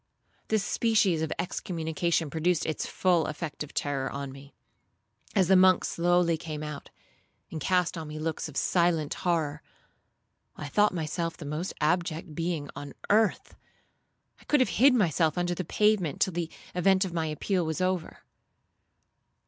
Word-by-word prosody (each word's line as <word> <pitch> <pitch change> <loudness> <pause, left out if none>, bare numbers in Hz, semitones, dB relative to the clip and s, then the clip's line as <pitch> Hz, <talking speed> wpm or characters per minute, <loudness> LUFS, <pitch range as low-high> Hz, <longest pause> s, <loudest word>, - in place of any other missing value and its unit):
This 220 -2 +1
species 210 -9 +2
of 160 - -2
excommunication 165 -2 -1
produced 165 +1 +1
its 160 - -2
full 175 -4 +2
effect 155 0 -5
of 150 - -11
terror 140 -2 -2
on 140 -1 -5
me. 140 +1 -13 0.8
As 190 -4 +4
the 190 - +5
monks 185 0 +5
slowly 175 -1 +2
came 155 -1 -6
out, 150 -2 -7 0.6
and 155 - -5
cast 180 +2 +1
on 160 - -6
me 150 0 -7
looks 155 0 -3
of 145 - -8
silent 170 -4 +2
horror, 160 -5 -1 0.9
I 145 - -7
thought 210 +6 +3
myself 165 +1 -3
the 160 - -8
most 155 +6 -4
abject 160 0 0
being 165 -2 -2
on 145 0 -7 0.2
earth; 215 -1 +2 0.9
I - - -18
could 295 - +3
have 255 - +3
hid 270 -1 +7
myself 165 - +2
under 175 0 0
the 185 - -3
pavement 200 -3 +1
till 190 - +1
the 170 -1 -2 0.2
event 190 +2 +3
of 180 - -6
my 165 -2 -1
appeal 175 +4 -1
was 160 0 -2
over. 185 -2 -2
170 Hz, 155 wpm, -28 LUFS, 155-185 Hz, 0.9 s, hid